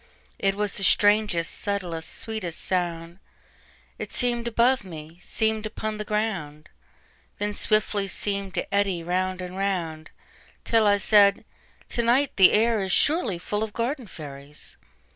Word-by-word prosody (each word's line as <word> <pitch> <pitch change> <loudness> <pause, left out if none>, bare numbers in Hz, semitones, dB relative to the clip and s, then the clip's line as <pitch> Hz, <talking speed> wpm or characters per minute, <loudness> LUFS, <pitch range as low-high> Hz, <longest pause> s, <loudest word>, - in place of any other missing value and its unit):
It 195 0 +1
was 210 0 -1
the 195 - -1
strangest, 205 -4 +3
subtlest, 175 -5 -3
sweetest 215 -7 -5
sound:It 170 -1 -6
seem'd 240 -1 0
above 240 +2 +2
me, 165 -2 -10
seem'd 220 +2 -1
upon 215 0 -5
the - - -2
ground, 195 -9 -3 0.7
Then 205 0 -2
swiftly 210 -1 +1
seem'd 200 0 -2
to - - -3
eddy 195 -4 +1
round 185 +1 -1
and 180 0 -7
round, 175 -5 -3 0.5
Till 225 -2 +3
I 205 0 +4
said: 200 -1 +4 0.4
"To 235 - -1
night 250 +5 +2
the 190 - +7
air 225 +1 +3
isSurely 195 - +2
full 205 +4 -3
of 220 -1 -3
garden 245 +1 -3
fairies." 145 -3 -10
200 Hz, 135 wpm, -25 LUFS, 175-220 Hz, 0.7 s, the